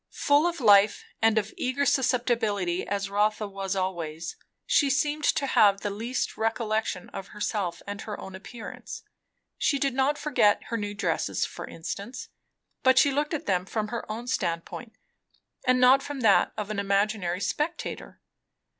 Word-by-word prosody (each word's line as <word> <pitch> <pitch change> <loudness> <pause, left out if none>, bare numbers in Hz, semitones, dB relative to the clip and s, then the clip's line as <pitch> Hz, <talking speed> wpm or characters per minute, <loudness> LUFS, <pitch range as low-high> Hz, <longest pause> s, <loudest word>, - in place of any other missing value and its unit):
Full 290 +3 +4
of 345 -2 -3
life 205 -3 +5 0.2
and 225 0 +4
of 215 0 0
eager 260 +3 0
susceptibility 230 -9 +1
as 200 0 -2
Rotha 210 +1 +1
was 195 -1 -4
always, 170 -4 -3 0.3
she 285 - +3
seemed 295 +2 0
to 280 - +2
have 200 -6 +4
the 205 - -2
least 230 +5 -3
recollection 220 -4 -1
of 195 0 -7
herself 205 -4 -3
and 205 0 -6
her 210 - -6
own 190 - -8
appearance. 220 +4 -9 0.6
She 280 - +2
did 275 -1 0
not 270 +3 +1
forget 250 -10 +2
her 230 - -2
new 205 -1 -4
dresses, 200 - -1
for - - -8
instance, 200 +9 -6 0.5
but 260 0 +4
she 280 +1 +6
looked 295 +3 0
at 300 - -5
them 180 -2 +1
from 215 0 -2
her 235 -2 -5
own 230 +3 -5
standpoint 200 +1 -3 0.7
and 255 0 +4
not 255 +2 +6
from 285 -2 -6
that 225 - +4
of 210 -1 -3
an 210 - -2
imaginary 200 -2 0
spectator. 305 - -3
215 Hz, 160 wpm, -27 LUFS, 200-260 Hz, 0.7 s, she